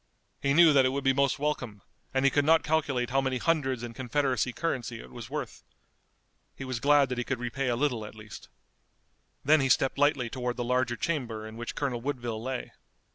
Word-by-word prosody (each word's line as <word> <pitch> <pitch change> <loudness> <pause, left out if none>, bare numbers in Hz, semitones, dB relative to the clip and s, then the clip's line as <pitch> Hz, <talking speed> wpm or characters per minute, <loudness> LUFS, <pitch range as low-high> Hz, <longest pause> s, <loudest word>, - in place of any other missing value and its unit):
He 140 0 +1
knew 165 -2 +7
that 135 -2 +6
it 130 - +3
would 140 +1 -3
be 135 -1 +4
most 140 0 +2
welcome, 130 -8 -3 0.3
and 135 0 +1
he 135 - +5
could 145 - +2
not 160 +2 +4
calculate 140 -6 0
how 135 +1 +3
many 130 -1 -1
hundreds 135 -5 0
in 120 -1 -6
Confederacy 130 0 0
currency 120 -5 -3
it - - -12
was 120 -1 -9
worth. 145 -4 -5 0.9
He 135 - -7
was 130 -3 -3
glad 145 +2 +4
that 125 -1 -3
he - - 0
could 130 +2 -2
repay 125 +2 -3
a 120 - +1
little 125 -4 0
at 105 - -9
least. 110 -2 -11 1.0
Then 155 +1 +5
he 135 - +1
stepped 135 +2 +2
lightly 140 -4 +2
toward 125 0 -3
the 120 - -2
larger 125 0 +1
chamber 120 -7 -3
in 110 0 -9
which 120 +1 -6
Colonel 130 -5 -2
Woodville 120 -4 -3
lay. 130 +1 -4
130 Hz, 210 wpm, -28 LUFS, 120-140 Hz, 1.0 s, knew